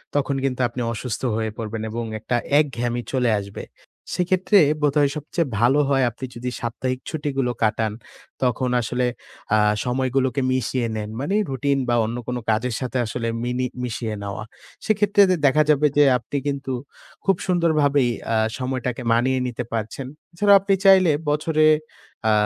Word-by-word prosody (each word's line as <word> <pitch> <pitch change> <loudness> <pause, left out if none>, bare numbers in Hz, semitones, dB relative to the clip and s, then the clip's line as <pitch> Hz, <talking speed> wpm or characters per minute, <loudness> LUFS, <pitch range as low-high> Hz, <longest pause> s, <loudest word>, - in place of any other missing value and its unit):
তখন 140 -1 +1
কিন্তু 130 -2 -1
আপনি 125 - -6
অসুস্থ 115 0 -4 0.2
হয়ে 110 -1 -2
পড়বেন 110 -1 -4
এবং 120 +1 -3 0.2
একটা 120 - -2 0.2
একঘেয়েমি 120 -5 -1
চলে 125 -2 +2
আসবে। 100 0 -8 0.5
সেক্ষেত্রে 185 +3 +3 0.2
বোধহয় 145 -1 +3
সবচেয়ে 150 +2 -2
ভালো 125 +5 +4
হয়। 135 -2 +3
আপনি 120 +3 -8
যদি 125 +1 -4
সাপ্তাহিক 125 +2 -3
ছুটিগুলো 140 -5 -1
কাটান, 110 0 +1 0.5
তখন 125 0 +1
আসলে 125 +2 -1 0.5
অ্যা 110 - +4 0.3
সময়গুলোকে 130 +1 0
মিশিয়ে 130 -1 0
নেন। 105 -1 -4
মানে 165 +9 -1
রুটিন 135 +1 0
বা 120 - +3
অন্য 115 +2 -4
কোনো 125 0 -2
কাজের 115 +2 0
সাথে 130 0 -3 0.5
মিনি 125 +1 -1 0.2
মিশিয়ে 110 -2 -3
নেওয়া। 100 +1 -5 0.4
সেক্ষেত্রে 205 -1 +3
দে 185 - +4
দেখা 150 +3 +5
যাবে 150 0 +4
যে 145 - +7
আপনি 125 +4 -5
কিন্তু 140 -2 -2 0.5
খুব 195 - +4
সুন্দরভাবেই 150 -7 +2 0.2
আ - - +2 0.2
সময়টাকে 130 -1 -3
মানিয়ে 130 +3 +2
নিতে 125 0 -4
পারছেন। 110 +4 -3 0.3
এছাড়াও 200 +3 +5
আপনি 195 +1 +1
চাইলে 190 -3 +7 0.2
বছরে 155 +1 +1 0.7
আ - - +4
130 Hz, 150 wpm, -22 LUFS, 120-145 Hz, 0.7 s, যে